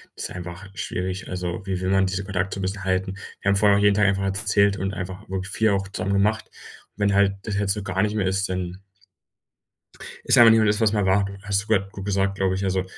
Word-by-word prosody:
ist - - -4
einfach 90 +2 -8
schwierig. 95 0 -4
Also, 90 +1 -4
wie 95 -2 -2
will 95 - -2
man 95 0 +3
diesen 95 +1 -3
Kontakt 95 -1 -2
so - - -5
'n - - -3
bisschen 95 +1 -3
halten? 95 0 -1 0.3
Wir 100 - 0
haben 100 - +3
vorher 100 0 +4
auch 100 - +1
jeden 100 -1 +4
Tag 105 0 +3
einfach 95 0 +1
erzählt 100 0 +2
und 95 +1 -3
einfach 95 +2 -7
wirklich 95 0 -4
viel 110 +2 +2
auch 95 -1 0
zusammen 100 0 -3
gemacht. 105 +2 +1 0.5
Und - - -26
wenn 100 -1 +2
halt 100 0 +3
das 105 -2 -3
jetzt 100 -1 +1
so 105 - -5
gar 95 -1 -1
nicht 105 +1 0
mehr 100 -3 0
ist, 95 0 0
dann 90 0 -4 1.4
ist - - +3
einfach 115 -1 +9
nicht 110 - +5
mehr 110 - +3
das 105 +1 +1
was 110 - +4
es - - -2
einmal 95 -2 +2
war. 100 0 -1
Hast 100 -1 0
du 105 - -19
grad 100 -3 +1
gut 100 -1 -8
gesagt, 100 0 0
glaube 95 -1 0
ich. 95 - -3
Also, 95 -1 0
95 Hz, 260 wpm, -23 LUFS, 95-100 Hz, 1.4 s, einfach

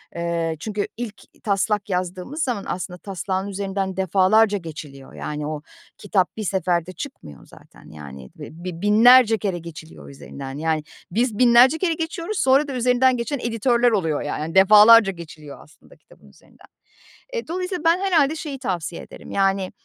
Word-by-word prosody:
eee, 170 -1 -2
çünkü 210 +1 -3
ilk 220 -5 -7 0.2
taslak 210 +1 -1
yazdığımız 185 - -3
zaman 240 -8 -3
aslında 180 0 -5
taslağın 190 0 -4
üzerinden 195 -1 -4
defalarca 200 +3 +3
geçiliyor. 150 -6 -10
Yani, 150 0 -5
o 155 -1 -5 0.4
kitap 195 -1 -1
bir 215 - -4
seferde 180 -3 -1
çıkmıyor 160 - -10
zaten. - - -18
Yani 70 -4 -11
ve - - -8
b 165 +2 -14
bi 175 -2 -6
binlerce 225 +2 +6
kere 185 -3 -3
geçiliyor 160 -1 -11
üzerinden. 135 0 -9
Yani, 160 0 -1 0.3
biz 230 +1 0
binlerce 250 +4 +5
kere 340 -1 0
geçiyoruz 335 +5 -4
sonra 270 +1 +3
da 275 - -5
üzerinden 250 +1 +2
geçen 255 +4 -3
editörler 240 +1 +1
oluyor 165 -8 0
ya 145 - -4
yani, 160 +3 -5
defalarca 210 +2 +7
geçiliyor 155 -4 -11
aslında 155 - -21
kitabın - - -22
üzerinden. - - -22 0.7
Eee, 470 -7 -4
dolayısıyla 365 0 -4
ben 335 +2 +4
herhâlde 320 -6 +2
şeyi 295 -4 -6
tavsiye 180 - -4
ederim, - - -13
yani, 195 -1 0
200 Hz, 155 wpm, -22 LUFS, 170-245 Hz, 0.7 s, defalarca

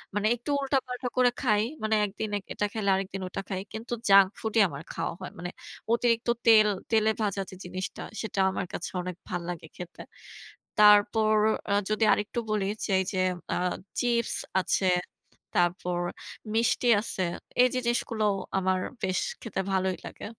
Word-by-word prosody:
মানে 205 +1 +2
একটু 240 +4 -9
উল্টাপাল্টা 260 -2 -1
করে 250 -1 +6
খাই। 210 -5 +3 0.2
মানে 215 0 +2
একদিনে 205 +1 -3 0.2
এটা 210 - 0
খেলে 215 -3 -1
আরেকদিন 195 0 -3
ওটা 195 - -4
খাই। 190 -2 -2
কিন্তু 230 +2 -5 0.2
junk 195 -1 +8
food 220 -1 -3
ই - - +8
আমার 145 0 -7
খাওয়া - - -2
হয়। 185 - -6
মানে 175 +1 -4 0.4
অতিরিক্ত 235 -1 +1 0.2
তেল 215 -2 +8 0.2
তেলে 220 -1 +4
ভাজা 200 -2 0
যে - - -9
জিনিসটা, 185 +1 -5 0.2
সেটা 220 -3 -4
আমার 190 - -3
কাছে 170 - -4
অনেক 180 -1 -5
ভাল্লাগে 175 -2 -4
খেতে। 175 -1 -8 0.8
তারপর 210 +1 +6 0.4
আ - - +3 0.2
যদি 215 +1 +1
আরেকটু 210 +4 -2
বলি, 210 -2 +1 0.2
যে - - -6
এইযে 190 0 -2 0.4
আ - - 0 0.4
চিপস 235 -1 +1 0.3
আছে, 185 +1 +1 0.7
তারপর 175 0 0 0.5
মিষ্টি 235 +2 +2
আছে। 200 -3 -3 0.4
এইযে 255 0 +2
জিনিসগুলোও 220 -3 +1 0.2
আমার 185 -1 +1 0.2
বেশ 185 -1 +1 0.2
খেতে 220 -4 -3
ভালোই 190 -1 +1
লাগে। - - -8
210 Hz, 155 wpm, -28 LUFS, 185-225 Hz, 0.8 s, junk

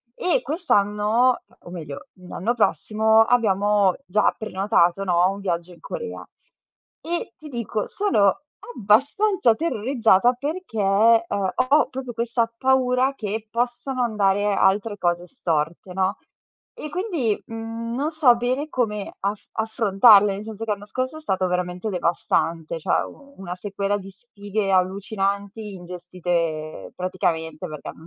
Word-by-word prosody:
E, 425 +8 +1
quest'anno, 230 - +1 0.2
o - - -11
meglio, 160 -5 -8
l'anno 185 +5 -3
prossimo, 220 -1 +3
abbiamo 205 -4 +2
già 210 +3 +2
prenotato 195 -3 +1
no, 180 0 +3
un 200 +1 -7
viaggio 175 -2 -3
in 170 - -19
Corea. 470 -2 -6 0.8
E 340 +1 -4
ti 305 - -11
dico: 235 -5 -3
sono 255 - +2 0.3
abbastanza 265 - +3
terrorizzata 240 - +2
perché, 295 0 -5 0.5
ehm, 200 -3 -1 0.2
ho 295 +2 +5
proprio 255 -1 -6
questa 235 0 0
paura 260 0 +2
che 215 0 -4
possano 245 +2 -2
andare 205 -2 +1
altre 205 +2 +2
cose 175 -1 0
storte, 165 +1 -2
no. 190 +2 0 0.6
E 305 - -7
quindi, 330 - -1
mhmm, 225 +1 -5
non 290 +4 -1
so 305 -7 +5
bene 255 +5 -1
come 210 -8 -2
aff 200 +1 -2
affrontarle. 210 -2 +5
Nel 200 +2 -6
senso 220 0 -6
che 225 - -4
l'anno 205 0 -6
scorso 255 +7 -3
è - - -10
stato 190 -11 0
veramente 180 +3 -2
devastante. 170 -2 -1
Cioè 160 - +1 0.3
una 185 -2 -6
sequela 200 +1 -2
di 195 -1 -10
sfighe 205 0 -4
allucinanti, 200 +2 -1
ingestite 175 -3 -4
praticamente, 165 -3 -2
mhmm, 160 - -10
perché - - -7
210 Hz, 130 wpm, -23 LUFS, 185-240 Hz, 0.8 s, ho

